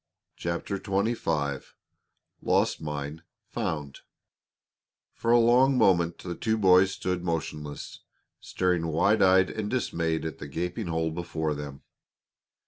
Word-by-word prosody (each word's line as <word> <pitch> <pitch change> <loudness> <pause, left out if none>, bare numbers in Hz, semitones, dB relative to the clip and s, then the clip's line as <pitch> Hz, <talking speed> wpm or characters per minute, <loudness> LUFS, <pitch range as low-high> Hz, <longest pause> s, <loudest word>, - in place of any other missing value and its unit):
CHAPTER 85 +3 -3
XXV 95 - -1 0.7
LOST - - +1
MINE 75 +1 -5 0.2
FOUND 75 -3 -4 1.1
For 115 - -1
a 120 - +7
long 125 +3 +4
moment 85 -6 +3
the 90 - -6
two 110 +4 -1
boys 95 -2 +5
stood 90 -2 -3
motionless, 75 -3 -4 0.4
staring 90 -2 -1
wide 100 +7 +2
eyed 95 0 +5
and 110 -2 -4
dismayed 85 -10 -1
at 80 -3 -5
the 75 - -7
gaping 90 +8 -3
hole 80 -1 -1
before 80 -2 -2
them. 70 -1 -8
85 Hz, 120 wpm, -27 LUFS, 80-100 Hz, 1.1 s, a